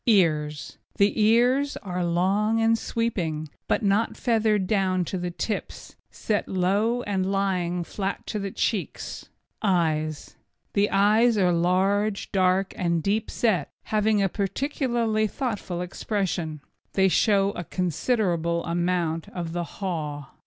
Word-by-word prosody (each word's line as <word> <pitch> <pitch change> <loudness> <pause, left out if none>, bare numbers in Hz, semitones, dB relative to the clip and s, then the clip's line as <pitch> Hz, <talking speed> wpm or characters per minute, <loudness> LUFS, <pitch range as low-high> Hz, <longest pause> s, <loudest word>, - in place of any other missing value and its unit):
EARS 155 -8 +1 0.2
The 205 +2 +2
ears 245 +6 +3
are 180 -2 -2
long 195 +6 +1
and 225 0 +4
sweeping, 175 -11 -2 0.2
but - - +1
not 205 +3 +1
feathered 220 -4 +2
down 185 -3 +1
to 185 - -3
the 175 0 -2
tips, 205 +5 -5
set 210 -2 -2
low 205 +6 +1
and 195 -2 -1
lying 180 -3 0
flat 195 +3 -4
to 215 - -3
the 200 0 -3
cheeks. 200 0 -3 0.3
EYES 155 -6 0 0.4
The 205 0 +2
eyes 215 +4 +4
are 180 -3 +3
large, 195 +4 +1
dark 185 0 +2
and 170 -3 0
deeply 210 +2 0
set, 190 -11 +1 0.2
having 210 -1 +3
a - - +3
peculiarly 230 - 0
thoughtful 205 -7 -3
expression. 180 -4 -3 0.3
They 190 -1 +4
show 200 +1 +3
a 175 - -5
considerable 175 - 0
amount 170 -1 -1
of 170 -2 -5
the 175 0 -1
haw. 150 -7 -5
195 Hz, 130 wpm, -25 LUFS, 175-215 Hz, 0.4 s, and